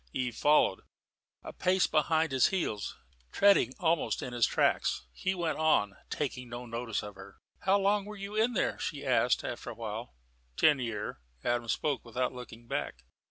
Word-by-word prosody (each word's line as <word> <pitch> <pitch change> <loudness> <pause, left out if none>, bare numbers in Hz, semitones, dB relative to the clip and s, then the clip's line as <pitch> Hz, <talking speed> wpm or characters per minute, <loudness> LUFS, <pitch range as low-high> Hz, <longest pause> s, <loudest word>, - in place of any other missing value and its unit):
Eve 125 -3 -2
followed, 145 -9 +3 0.6
a - - -8
pace 185 0 +2
behind 160 0 +2
his 130 -1 +4
heels, 110 - -2 0.3
treading 200 - +5
almost 165 -2 +1
in 125 - -5
his 120 -1 +3
tracks. - - +1
He 185 - -1
went 170 -3 -1
on, 105 -11 +3
taking 125 -4 -3
no 120 +1 -6
notice 115 -1 -3
of 105 0 -7
her. 95 +1 -13 0.2
"How 195 +1 +3
long 200 0 +2
were 210 0 -8
you 200 +1 -6
in 225 +3 +2
there?" 210 - 0
she - - -4
asked, - - +2
after - - -5
a - - -7
while. - - -6 0.4
"Ten 150 -3 +5
year'." 105 - -4 0.2
Adam 120 -1 0
spoke 140 +5 -1
without 125 +2 -2
looking 120 -2 -10
back. 60 - -4
130 Hz, 170 wpm, -31 LUFS, 115-180 Hz, 0.6 s, treading